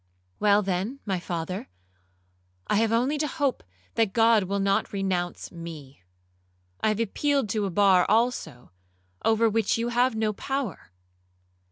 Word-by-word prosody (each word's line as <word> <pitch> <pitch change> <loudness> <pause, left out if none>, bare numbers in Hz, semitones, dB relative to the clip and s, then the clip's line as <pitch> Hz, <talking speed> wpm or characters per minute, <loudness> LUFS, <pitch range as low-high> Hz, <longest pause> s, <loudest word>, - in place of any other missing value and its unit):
'Well, 210 0 +4
then, 195 +8 -2
my 190 -3 -1
father, 175 - -4 1.0
I - - +1
have 225 0 +2
only 255 +6 +1
to 300 - 0
hope 280 -2 -1 0.3
that 220 -4 +1
God 225 -3 +4
will 200 +2 -2
not 195 0 +1
renounce 185 -3 -2
me. 160 - -10 0.8
I - - +2
have 215 0 +1
appealed 270 +2 0
to 210 +1 0
a - - -3
bar 190 -1 +4
also, 215 - 0 0.5
over 225 +1 +3
which 225 -1 +1
you 230 +1 -1
have 245 0 +2
no 220 -1 0
power.' 270 - -4
210 Hz, 145 wpm, -26 LUFS, 185-230 Hz, 1.0 s, Well